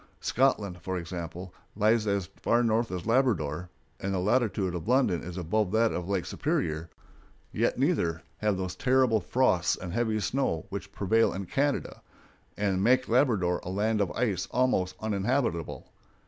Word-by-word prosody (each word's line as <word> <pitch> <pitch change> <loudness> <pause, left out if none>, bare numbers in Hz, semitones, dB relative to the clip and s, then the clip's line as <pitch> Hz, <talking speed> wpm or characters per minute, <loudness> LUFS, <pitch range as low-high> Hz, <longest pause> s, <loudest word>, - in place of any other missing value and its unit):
Scotland, 105 -9 +1
for 95 +2 -3
example, 85 +1 -6 0.2
lies 110 +1 +2
as 100 -2 0 0.2
far 120 +1 +3
north 115 -1 +1
as 90 -1 -4
Labrador, 90 - +1 0.3
and 100 - -3
the 95 - 0
latitude 105 -2 +1
of 85 0 -5
London 125 -8 +2
is 90 +1 -7
above 95 +3 0
that 115 0 +3
of 90 +1 -4
Lake 95 -3 0
Superior, 80 +1 -2 0.6
yet - - 0
neither 105 - +1 0.2
have 105 -2 +1
those 95 -1 -3
terrible 130 -3 +3
frosts 95 -9 +2
and 90 -2 -7
heavy 110 -1 0
snows 120 - -1
which 100 -1 -6
prevail 110 +3 +2
in 95 0 -4
Canada, 140 +8 -1 0.6
and 100 -2 0
make 125 +4 +3
Labrador 110 -8 +2
a - - -6
land 105 +3 0
of 100 - +1
ice 105 -7 -1
almost 115 -7 +1
uninhabitable. 110 - -1
100 Hz, 155 wpm, -28 LUFS, 90-115 Hz, 0.6 s, far